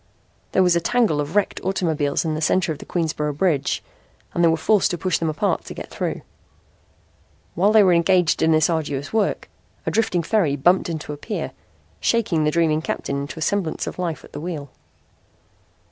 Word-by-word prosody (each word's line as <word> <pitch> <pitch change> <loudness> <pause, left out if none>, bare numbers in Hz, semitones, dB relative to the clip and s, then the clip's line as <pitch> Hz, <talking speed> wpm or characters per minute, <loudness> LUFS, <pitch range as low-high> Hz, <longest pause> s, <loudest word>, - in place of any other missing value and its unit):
There 190 - +4
was 180 -1 +4
a 170 - +2
tangle 200 -6 +2
of 145 +5 -5
wrecked 205 -2 +1
automobiles 160 -6 0
in 160 - 0
the 155 - -3
center 175 +1 +2
of 150 - -5
the - - -11
Queensboro 155 -3 -1
Bridge 145 -3 0 0.5
and 170 - +1
they - - +6
were 165 0 +3
forced 210 +4 +3
to 175 - -2
push 180 +1 0
them 165 - 0
apart 155 - 0
to - - -8
get - - -8
through. - - -3 1.3
While 195 +5 +3
they 215 -1 +7
were 185 -2 +5
engaged 170 0 +3
in 160 - +4
this 155 -1 +4
arduous 145 -3 -2
work, 220 -2 0 0.4
a - - 0
drifting 185 -6 +1
ferry 165 -7 +1
bumped 175 +6 +2
into 155 -2 -4
a - - -8
pier, 210 +8 -4 0.5
shaking 185 -10 +1
the - - +3
dreaming 155 -1 +2
captain 140 -3 -3
into 140 +3 -7
a 160 - -2
semblance 185 -2 -1
of - - -6
life 170 -3 -3
at - - -15
the - - -6
wheel. 155 -5 -5
165 Hz, 195 wpm, -22 LUFS, 155-185 Hz, 1.3 s, they